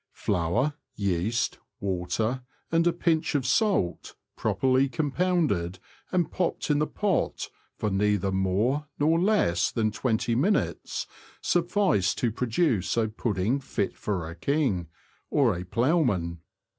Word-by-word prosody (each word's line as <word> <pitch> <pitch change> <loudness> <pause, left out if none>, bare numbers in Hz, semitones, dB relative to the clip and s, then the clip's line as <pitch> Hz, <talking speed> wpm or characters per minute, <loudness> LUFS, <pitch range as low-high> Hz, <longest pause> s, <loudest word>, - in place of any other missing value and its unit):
Flour, 105 - 0 0.2
yeast, 100 +3 0 0.2
water, 100 +6 -1 0.3
and 165 +1 +3
a - - +5
pinch 165 -2 0
of 135 -3 +1
salt, 185 - +1 0.2
properly 130 +1 +2
compounded, 145 - 0 0.3
and 180 -3 +1
popped 175 -4 -1
in 145 - +3
the 150 - +1
pot 205 -4 -1 0.3
for 105 - -1
neither 100 -1 +1
more 100 +10 +1
nor 160 +3 +3
less 175 - +2
than 110 -2 0
twenty 115 +1 0
minutes, 170 - 0 0.3
suffice 175 - +2
to 120 - 0
produce 120 - 0
a 110 -2 +2
pudding 110 +3 0
fit 105 -7 -2
for 90 -6 -3
a 85 - -7
king 105 - 0 0.2
— - - -34
or 125 -9 +3
a 90 - -4
ploughman. 105 - +1
120 Hz, 130 wpm, -27 LUFS, 95-155 Hz, 0.3 s, a